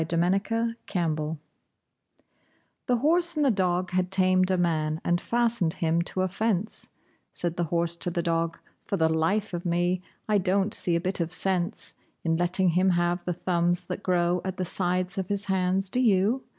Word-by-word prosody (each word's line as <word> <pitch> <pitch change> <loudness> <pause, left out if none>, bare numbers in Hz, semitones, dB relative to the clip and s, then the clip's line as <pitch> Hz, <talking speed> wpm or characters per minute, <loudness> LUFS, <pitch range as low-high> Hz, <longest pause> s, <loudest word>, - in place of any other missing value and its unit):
HORSE, 160 - -2
DOG 195 +7 +1 0.2
AND 170 -3 +1
MAN 155 +1 -4 1.5
The 250 - +3
horse 340 +7 +2
and 300 - +2
the 270 - +4
dog 180 -3 0
had 185 0 0
tamed 185 -1 +3
a 185 - +2
man 155 -3 0
and 175 +1 +1
fastened 235 -8 +1
him 165 0 0
to 185 +2 -2
a - - +1
fence: 215 +1 -2 0.4
Said 175 -1 0
the 175 - -1
horse 170 +1 0
to 175 - 0
the 170 0 -2
dog: 165 0 -1 0.2
"For 200 - -3
the 160 -2 +3
life 185 +7 0
of 175 0 -3
me, 175 +1 0 0.3
I 210 -1 +3
don't 195 +2 +1
see 175 - +1
a - - +2
bit 185 +2 -1
of 165 -1 -2
sense 180 +2 -1 0.3
In 165 -1 +1
letting 175 +2 +3
him 180 +3 +2
have 175 0 0
the 180 - -1
thumbs 175 0 0
that - - -5
grow 175 -2 +1
at 190 -1 -4
the 185 - -2
sides 180 +1 -1
of 190 - -3
his 200 0 -2
hands. 190 0 0
Do 250 - 0
you?" 220 +2 +2
180 Hz, 190 wpm, -26 LUFS, 170-195 Hz, 1.5 s, the